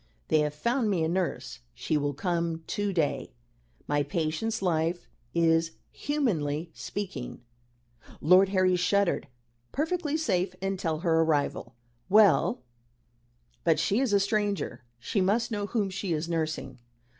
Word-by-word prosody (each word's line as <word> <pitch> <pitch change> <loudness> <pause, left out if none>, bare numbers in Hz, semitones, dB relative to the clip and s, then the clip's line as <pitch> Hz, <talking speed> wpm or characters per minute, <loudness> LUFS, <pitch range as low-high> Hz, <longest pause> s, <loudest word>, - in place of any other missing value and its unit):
"They 155 - +4
have 150 0 0
found 235 - 0
me 180 -5 +1
a - - +1
nurse. 175 - -2 0.2
She 155 - -2
will 145 -1 0
come 170 0 -1
to 205 -1 -1
day. 155 - -1 0.5
My 145 0 +1
patient's 165 +9 -2
life 170 0 0 0.3
is, 165 -1 +3 0.2
humanly 170 - -1
speaking" 145 -14 -6 0.8
Lord 185 +4 +5
Harry 185 -2 +3
shuddered 180 0 +1 0.4
"perfectly 315 +1 -1
safe 185 - 0
until 180 -5 -2
her 165 -2 +3
arrival." 145 -6 0 0.3
"Well 195 -11 +4 1.0
but 165 -2 +3
she 205 - +1
is 265 -4 +1
a 200 - +4
stranger. 200 - -1
She 190 - -1
must 215 +6 +1
know 205 -2 -2
whom 205 -3 -1
she 190 -2 -2
is 155 +1 -2
nursing." 155 -6 -3
175 Hz, 135 wpm, -28 LUFS, 155-205 Hz, 1.0 s, Lord